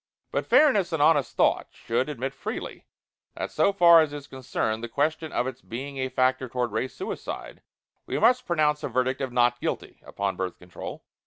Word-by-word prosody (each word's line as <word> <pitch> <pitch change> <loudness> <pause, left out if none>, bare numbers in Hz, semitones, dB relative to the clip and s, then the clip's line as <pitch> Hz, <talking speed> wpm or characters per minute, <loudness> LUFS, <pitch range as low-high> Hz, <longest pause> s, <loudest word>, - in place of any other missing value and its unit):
But - - -2
fairness 210 - +4
and 160 - -1
honest 145 -2 +3
thought - - +2
should 125 +5 -2
admit 135 -1 -4
freely - - -6 0.5
that - - -4
so 160 +6 +3
far 170 -4 +7
as 150 -2 -1
is 145 -1 -7
concerned 125 -4 -3
the 120 - -4
question 155 +5 -1
of - - 0
its 130 0 -6
being 135 +4 -6
a 130 0 -1
factor 130 0 +1
toward 125 -1 -1
Race 130 - -2
Suicide, 385 - -6 0.5
we - - -2
must 250 +1 +3
pronounce 150 -3 +2
a - - -2
verdict 130 +2 0
of 130 -2 -2
"Not 120 0 +2
Guilty" - - -4
upon 100 -1 -3
Birth 95 -2 -3
Control. 90 0 -9
130 Hz, 185 wpm, -26 LUFS, 125-155 Hz, 0.5 s, far